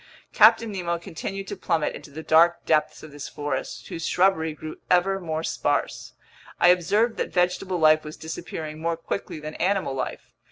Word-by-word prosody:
Captain 230 Hz, -2 st, +6 dB
Nemo 175 Hz, -3 st, -2 dB
continued 195 Hz, +3 st, -6 dB
to 205 Hz, -, -5 dB
plummet 165 Hz, -5 st, -1 dB
into -, -, -10 dB
the 155 Hz, +3 st, -8 dB
dark 170 Hz, +2 st, +4 dB
depths 155 Hz, -1 st, +1 dB
of 155 Hz, -, -10 dB
this 145 Hz, -1 st, -7 dB
forest, 145 Hz, 0 st, -4 dB
whose 165 Hz, -, -4 dB
shrubbery 175 Hz, -4 st, +2 dB
grew 155 Hz, 0 st, -8 dB
ever 190 Hz, +2 st, +3 dB
more 160 Hz, -3 st, -3 dB
sparse. -, -, -2 dB, 0.5 s
I 175 Hz, -, +6 dB
observed 205 Hz, +6 st, +2 dB
that -, -, -2 dB
vegetable 180 Hz, +1 st, 0 dB
life 155 Hz, -1 st, +5 dB
was 150 Hz, 0 st, -8 dB
disappearing 160 Hz, -1 st, -6 dB
more 165 Hz, 0 st, -1 dB
quickly 165 Hz, 0 st, -5 dB
than 155 Hz, 0 st, -7 dB
animal 190 Hz, -6 st, 0 dB
life. 130 Hz, -1 st, -5 dB
165 Hz, 170 wpm, -25 LUFS, 155-185 Hz, 0.5 s, Captain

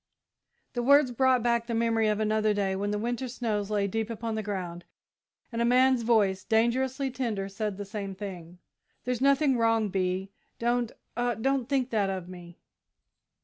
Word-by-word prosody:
The 245 Hz, -, -1 dB
words 280 Hz, +1 st, +5 dB
brought 255 Hz, 0 st, +3 dB
back 235 Hz, -1 st, +1 dB
the 235 Hz, -, -2 dB
memory 225 Hz, -1 st, +2 dB
of 210 Hz, 0 st, +1 dB
another 215 Hz, 0 st, +1 dB
day, 195 Hz, -2 st, 0 dB
when 200 Hz, +2 st, -2 dB
the 210 Hz, -, -1 dB
winter 240 Hz, +4 st, -2 dB
snows 220 Hz, -4 st, -2 dB
lay 205 Hz, -2 st, +1 dB
deep 220 Hz, +3 st, -2 dB
upon 230 Hz, 0 st, -4 dB
the 220 Hz, -, -2 dB
ground, 180 Hz, -4 st, -5 dB, 0.7 s
and 230 Hz, 0 st, -2 dB
a -, -, +3 dB
man's 255 Hz, +1 st, +4 dB
voice, 210 Hz, -5 st, +2 dB
dangerously 260 Hz, +4 st, +1 dB
tender, 225 Hz, -7 st, -2 dB
said 205 Hz, 0 st, -4 dB
the 205 Hz, -, -5 dB
same 195 Hz, -1 st, -5 dB
thing. 180 Hz, -3 st, -8 dB, 0.5 s
"There's 250 Hz, -1 st, -2 dB
nothing 275 Hz, -1 st, +3 dB
wrong, 225 Hz, -2 st, +2 dB
Bee 190 Hz, 0 st, -1 dB, 0.3 s
don't, 240 Hz, 0 st, 0 dB, 0.2 s
oh, 240 Hz, -1 st, 0 dB
don't 270 Hz, +1 st, 0 dB
think 265 Hz, -3 st, 0 dB
that 205 Hz, -3 st, +1 dB
of 185 Hz, -2 st, -4 dB
me!" 175 Hz, -1 st, -11 dB
225 Hz, 175 wpm, -28 LUFS, 200-245 Hz, 0.7 s, words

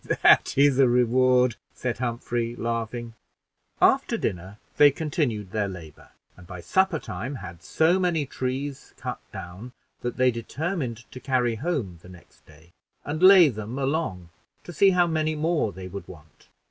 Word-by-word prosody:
"That -, -, +5 dB
is 140 Hz, -1 st, +4 dB
a 135 Hz, -, +6 dB
reward," 125 Hz, 0 st, +3 dB, 0.2 s
said 120 Hz, -2 st, -3 dB
Humphrey, 120 Hz, -1 st, -3 dB
laughing. 115 Hz, 0 st, -4 dB, 0.7 s
After -, -, +3 dB
dinner 95 Hz, +3 st, -4 dB, 0.2 s
they 145 Hz, -, +8 dB
continued 135 Hz, -, -2 dB
their 105 Hz, -1 st, -1 dB
labor, 85 Hz, -6 st, -11 dB, 0.3 s
and 90 Hz, -1 st, -16 dB
by 90 Hz, 0 st, -8 dB
supper 190 Hz, -, +1 dB
time 135 Hz, -1 st, -6 dB
had 85 Hz, -8 st, -9 dB
so 165 Hz, -, +2 dB
many 170 Hz, -5 st, 0 dB
trees 135 Hz, +1 st, -5 dB
cut -, -, -5 dB
down, 100 Hz, +9 st, -9 dB, 0.3 s
that 120 Hz, -1 st, -5 dB
they 130 Hz, 0 st, +4 dB
determined 125 Hz, -, -4 dB
to 130 Hz, -, -9 dB
carry 125 Hz, -3 st, 0 dB
home 125 Hz, -, -3 dB
the 90 Hz, -, -15 dB
next 90 Hz, -1 st, -17 dB
day, 80 Hz, +2 st, -19 dB, 0.3 s
and 150 Hz, +3 st, -4 dB
lay 185 Hz, -2 st, +8 dB
them 110 Hz, +1 st, -6 dB
along 135 Hz, -, -2 dB, 0.3 s
to 175 Hz, -, -10 dB
see 195 Hz, +5 st, +5 dB
how 180 Hz, -2 st, +3 dB
many 155 Hz, -1 st, -1 dB
more 155 Hz, -7 st, 0 dB
they 95 Hz, 0 st, -9 dB
would 95 Hz, -1 st, -8 dB
want. 75 Hz, -5 st, -16 dB
125 Hz, 160 wpm, -25 LUFS, 100-150 Hz, 0.7 s, they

